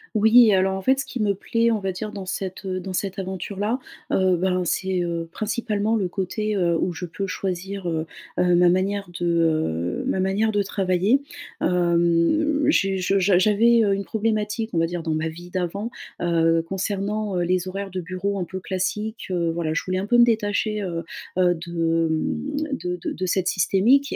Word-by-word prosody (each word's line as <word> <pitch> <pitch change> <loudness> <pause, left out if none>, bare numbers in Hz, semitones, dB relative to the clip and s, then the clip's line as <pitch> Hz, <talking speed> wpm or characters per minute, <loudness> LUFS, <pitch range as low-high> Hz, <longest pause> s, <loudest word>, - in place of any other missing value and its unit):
Oui, 220 0 +6
alors 190 0 +2
en 190 - -4
fait 265 +5 +3
ce - - -2
qui 245 - -5
me 205 -1 +2
plaît, 230 +4 +1
on 220 - +1
va 195 -1 -2
dire, 210 +3 -5
dans 200 -2 -7
cette, 190 +1 -5
heu, 185 -1 -2
dans 185 +1 -6
cette 195 +1 -2
aventure-là, 195 +5 -3 0.3
heu, 185 -2 +3
ben, 185 0 +1
c'est, 185 +1 0
heu, 170 -1 -3
principalement 215 0 -1
le 195 -4 0
côté, 210 +3 -2
heu, 170 -3 +2
où 180 - 0
je 180 - -5
peux 195 +3 -4
choisir, 185 +1 -4
heu, 160 -1 -1 0.3
heu, 180 -1 +4
ma 175 0 +5
manière 195 +2 0
de, 175 - -1
heu 155 - 0
ma - - 0
manière 195 +4 +1
de 205 - +1
travailler. 195 +6 +1 0.4
Hem, 175 - +2
j'ai 195 -9 +2
je 190 +2 +1
j'a 185 -1 +4
j'avais, 225 +4 +4
heu, 200 -2 +2
une 200 0 -2
problématique, 220 0 -1
on - - 0
va 165 - +3
dire, 175 0 -4
dans 160 - -1
ma 155 +1 -1
vie 175 +2 -10
d'avant, 185 +5 -3 0.3
heu, 165 -1 +3
concernant, 200 +1 -2
heu, 175 - +1
les 180 +1 0
horaires 195 +1 -4
de 185 0 -3
bureau 185 +3 -3
un 180 - -2
peu 190 +1 -6
classiques. 210 +4 -3
Heu, 170 -2 0
voilà, 165 -2 -2
je - - 0
voulais 185 0 -1
un 195 - -2
peu 240 +4 +3
me 240 - +8
détacher, 215 -2 +1
heu, 170 -3 -3 0.3
heu, 180 -1 +4
de, 165 -1 0
mmh, 270 - -2 0.3
de 180 0 -1
de - - -2
de 185 - -3
cette 185 0 0
systémique. 225 - +3
190 Hz, 200 wpm, -23 LUFS, 175-210 Hz, 0.4 s, me